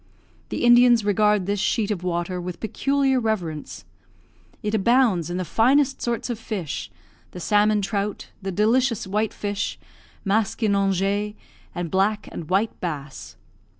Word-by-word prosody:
The - - -3
Indians 240 -2 +6
regard 210 -1 +3
this 205 +1 -1
sheet 215 +2 0
of 185 -4 -3
water 180 0 -2
with 175 -1 -6
peculiar 270 +4 +1
reverence. 180 -10 -3 0.8
It 210 0 -2
abounds 220 - +3
in 175 - -3
the 185 - -2
finest 270 - +2
sorts 235 -1 -2
of 230 - -5
fish, 200 -9 -4 0.4
the 180 - -7
salmon 210 +2 +2
trout, 205 +1 -3
the 195 0 -3
delicious 230 +4 +2
white 210 +3 -1
fish, 205 -1 -3 0.5
maskinonge, 200 -1 +1 0.4
and 175 -2 -4
black 205 +3 +1
and 160 - -7
white 200 +4 0
bass. 150 -5 -6
205 Hz, 135 wpm, -23 LUFS, 185-225 Hz, 0.8 s, Indians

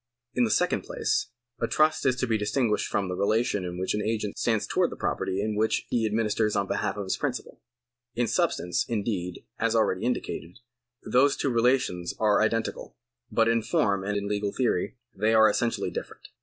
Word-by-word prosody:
In 125 - +3
the - - -1
second - - +2
jjlace, - - -1 0.3
a 115 - 0
trust 155 0 +2
is 130 - +3
to 130 - -1
be 115 -2 +1
distinguished 105 +1 0
from 100 -1 -1
the 90 - -3
relation 105 +1 +1
in 90 -1 -5
which 95 +1 -1
an 105 - -1
agent 105 -2 -2
stands 110 -3 +1
towards - - +1
the - - -7
property 100 +2 -1
which 110 +1 +1
he 115 -2 +2
administers 110 0 0
on 100 - +1
behalf 105 0 -1
of 100 - -2
his 95 - -2
principal. - - -4 0.5
In 120 +1 +1
substance, 90 -5 0
indeed, 100 -6 -3
as 115 0 +1
already 110 -4 +2
indicated, 115 -6 -3 0.5
these 135 +3 +3
two 135 - 0
relations 120 -7 +1
are 105 -2 +3
identical, 115 +1 -1 0.3
but 115 -1 +3
in 115 0 +3
form 100 -3 +1
and 105 +1 -1
in 100 0 -3
legal 100 0 -1
theory 125 -2 0 0.2
they 110 +3 +2
are 110 0 +7
essentially 120 +1 0
different. - - -7
110 Hz, 185 wpm, -27 LUFS, 100-115 Hz, 0.5 s, are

